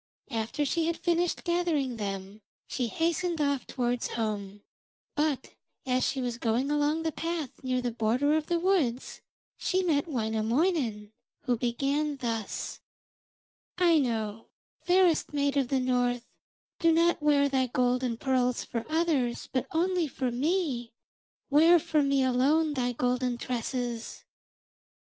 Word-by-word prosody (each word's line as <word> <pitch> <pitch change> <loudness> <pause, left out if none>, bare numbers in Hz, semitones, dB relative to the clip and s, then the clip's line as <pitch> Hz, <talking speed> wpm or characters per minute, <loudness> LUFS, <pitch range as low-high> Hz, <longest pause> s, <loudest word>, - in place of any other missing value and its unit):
After 230 +6 -1
she 325 +3 0
had 335 - -1
finished 345 0 0
gathering 335 -8 0
them 195 0 -5 0.2
she 250 -2 -2
hastened 335 +5 -1
off 280 -3 0
towards 245 -1 -1
home, 205 -3 -4 0.5
but 295 -3 -1 0.3
as 255 -1 +1
she 270 - 0
was 245 -2 -3
going 240 +5 0
along 295 +2 +1
the 320 - 0
path 330 -4 -3
near 255 -1 -1
the 245 - -1
border 240 +6 +1
of 315 -1 -1
the 345 - +1
woods 330 -10 0 0.4
she 375 0 +1
met 310 -3 +1
Wainamoinen, 225 - 0 0.3
who 250 -3 0
began 275 +5 -1
thus: 230 -4 -4 1.0
'Aino, 235 - +1 0.3
fairest 355 -4 +3
maid 285 -1 +1
of 275 -3 +2
the 270 +1 +1
north, 245 -1 0 0.5
do 330 -1 +4
not 335 0 +3
wear 290 -1 +4
thy 265 -2 +1
gold 250 +1 +1
and 235 -2 -2
pearls 255 -2 +1
for 230 -1 -4
others, 310 -7 0
but 255 - 0
only 350 0 +1
for 260 -2 -2
me; 265 -3 -1 0.6
wear 325 +4 +7
for 310 -1 +1
me 275 -1 +2
alone 285 +5 +2
thy 250 -3 0
golden 250 0 0
tresses.' 240 -1 -4
265 Hz, 135 wpm, -28 LUFS, 240-315 Hz, 1.0 s, wear